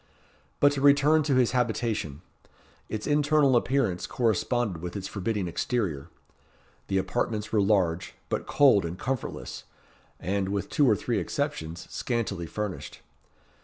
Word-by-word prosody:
But 145 - +6
to 140 -1 -3
return 145 +2 +5
to 145 -3 +1
his 125 -2 +3
habitation. 110 - -1 0.7
Its 110 -1 -4
internal 145 -2 +3
appearance 120 -7 +1
corresponded 115 -4 0
with 90 +2 -6
its 95 -2 -4
forbidding 100 -1 -2
exterior. 85 - -2 0.8
The 95 - 0
apartments 105 +1 -1
were 105 - +3
large, 95 -4 +1
but - - -3
cold 135 -8 +5
and 85 +1 -4
comfortless, 130 +2 -4 0.5
and, 95 +2 -1
with 100 0 -2
two 145 -5 +3
or 110 - +5
three - - -1
exceptions, 80 +1 -3
scantily 105 -8 -2
furnished. 105 +1 -5
110 Hz, 130 wpm, -27 LUFS, 95-130 Hz, 0.8 s, But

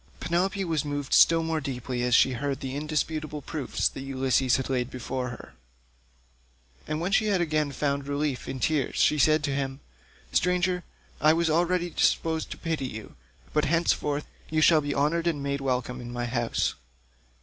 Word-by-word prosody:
Penelope 190 +3 0
was 160 -4 0
moved 145 -2 -3
still 165 0 +6
more 160 -1 -1
deeply 125 -2 -4
as 125 0 +3
she 130 - +5
heard 135 +2 -2
the 130 0 -5
indisputable 155 0 -2
proofs 145 -4 -1
that 135 - -6
Ulysses 130 -1 +1
laid 125 -2 -1
before 130 0 -4
her; 125 - -10 1.3
and 155 - -2
when 175 +4 -2
she 215 +2 +3
had 200 -3 +2
again 155 -3 0
found 140 0 -1
relief 145 -2 -2
in 130 - -4
tears 150 -1 0
she 150 - +3
said 155 +2 +4
to 145 -2 0
him, 135 -1 -2 0.5
"Stranger, 180 0 +1 0.4
I 155 +1 +6
was 165 -1 +1
already 175 +2 +1
disposed 160 0 +1
to - - -6
pity 160 -5 -2
you, 110 -3 -9 0.4
but 150 0 +2
henceforth 150 -2 +1 0.2
you 155 - +1
shall 155 0 +6
be 145 -1 -3
honoured 165 +4 +1
and 150 -4 -1
made 140 0 -2
welcome 125 -1 -2
in 120 0 -7
my 120 0 -3
house. 120 -1 0
145 Hz, 170 wpm, -27 LUFS, 130-160 Hz, 1.3 s, still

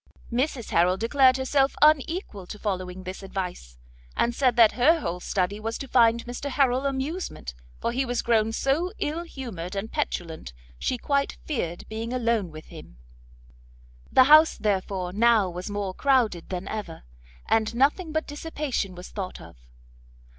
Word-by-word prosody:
Mrs 250 -1 -1
Harrel 180 +2 +3
declared 255 +4 +4
herself 270 +1 +1
unequal 305 - +2
to 210 - -7
following 185 -3 -4
this 185 +1 -7
advice, 180 - -6 0.4
and 240 - +2
said 255 -1 +2
that 230 -3 +7
her 310 +7 +4
whole 180 - -3
study 190 +3 -1
was 225 +1 -3
to 275 - -7
find 235 -2 +3
Mr 245 +4 -5
Harrel 265 -1 +2
amusement, 275 - -4 0.3
for 235 - -1
he 260 +3 0
was 245 -2 -2
grown 225 -2 +2
so 285 +10 0
ill 310 +3 -2
humoured 225 - -7
and 200 +3 -4
petulant 170 - -4 0.3
she 255 - -1
quite 280 +3 -1
feared 175 - -3
being 225 +2 -5
alone 230 -6 0
with 155 0 -11
him. - - -12 1.1
The 260 - +7
house 310 +4 +7
therefore 190 -3 -1
now 220 -3 +4
was 180 +3 -6
more 205 -2 -3
crowded 235 -9 +1
than 180 0 -4
ever, 205 -7 -6 0.4
and 220 +1 +1
nothing 295 +7 +2
but 315 +1 -1
dissipation 290 - -3
was 180 +1 -9
thought 190 -3 -6
of. - - -13
230 Hz, 155 wpm, -26 LUFS, 190-275 Hz, 1.1 s, that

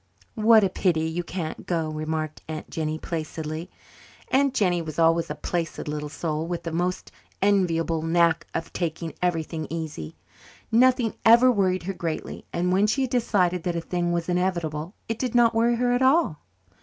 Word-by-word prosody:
"What 220 -1 +5
a 195 - +3
pity 170 -4 +1
you 170 +2 -3
can't 170 -2 -5
go," 165 -3 0
remarked 155 0 -3
Aunt 155 -1 -6
Jennie 155 -1 -2
placidly. 160 0 -5 0.6
Aunt 275 +1 +3
Jennie 180 -4 +2
was 155 -2 -7
always 165 0 +3
a - - -3
placid 170 -3 -3
little 150 0 -3
soul, 155 +1 -3
with 175 0 -4
a 165 - -3
most 180 +2 -2 0.3
enviable 170 -5 +2
knack 165 0 +2
of 165 - -4
taking 165 -1 -3
everything 165 -3 -1
easy. 155 - -5 0.6
Nothing 245 0 +4
ever 235 +3 +7
worried 185 -5 +1
her 195 +3 -3
greatly, 165 -3 -5
and 180 +1 0
when 200 +3 +3
she 270 +6 +1
had 255 - -3
decided 185 -8 +1
that 175 0 -2
a - - 0
thing 175 0 -1
was 170 -1 -1
inevitable 175 -2 -1
it 225 -1 -3
did 250 -2 -2
not 240 -1 +5
worry 230 +1 +3
her 245 +1 +1
at 245 +1 +1
all. 265 - +3
175 Hz, 175 wpm, -25 LUFS, 160-205 Hz, 0.6 s, ever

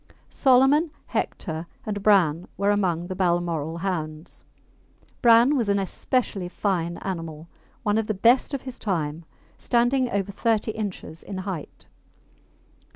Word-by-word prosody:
Solomon, 270 +5 +4 0.2
Hector, 160 -2 -3 0.2
and 205 -1 -3
Bran 180 -5 +3
were 200 +1 +2
among 180 -5 0
the 185 +1 -5
Balmoral 170 -3 0
hounds. 160 -3 -4 0.8
Bran 235 +4 +6
was 235 -6 +1
an 200 - +3
especially 195 -1 -1
fine 175 -3 -1
animal 165 -4 -5 0.4
one 210 -1 +2
of 220 - -2
the 215 - -1
best 240 +7 +3
of 270 - -6
his 260 -2 -8
time, 165 -5 -2 0.3
standing 245 +1 +2
over 200 -2 -1
thirty 220 +1 0
inches 200 -7 -6
in 195 - -7
height. 185 -5 -6
195 Hz, 130 wpm, -25 LUFS, 170-230 Hz, 0.8 s, Bran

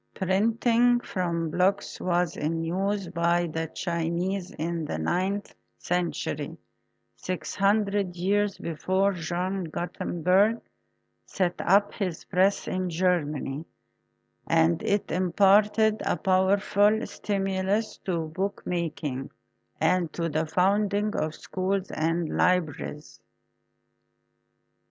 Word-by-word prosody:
Printing 230 +5 +3
from 170 -6 -2
blocks 195 +4 0
was 175 -2 +1
in 165 +2 -2
use 195 +3 -1
by 170 0 +1
the 160 0 -3
Chinese 175 +3 -2
in 165 +1 -3
the 80 - -3
ninth 185 - -1 0.2
century, 170 -4 -2 0.6
six 185 -1 -4
hundred 200 -2 +1
years 200 +3 +1
before 185 +5 0
John 180 +2 -2
Gutenberg 180 +6 +1 0.7
set 180 -2 0
up 200 +2 +3
his 185 -6 -3
press 190 +2 +2
in 185 -1 -1
Germany, 160 -5 0 0.8
and 80 +1 +3
it 205 0 0
imparted 205 +4 +3
a - - 0
powerful 200 +3 +3
stimulus 195 +2 -1
to 175 -3 0
bookmaking 165 -6 -3 0.5
and 170 0 +2
to 165 -1 -2
the 155 +1 -1
founding 205 +4 +1
of 155 0 -1
schools 190 +1 -2
and 165 +1 0
libraries. 160 -4 -1
185 Hz, 100 wpm, -27 LUFS, 170-200 Hz, 0.8 s, Printing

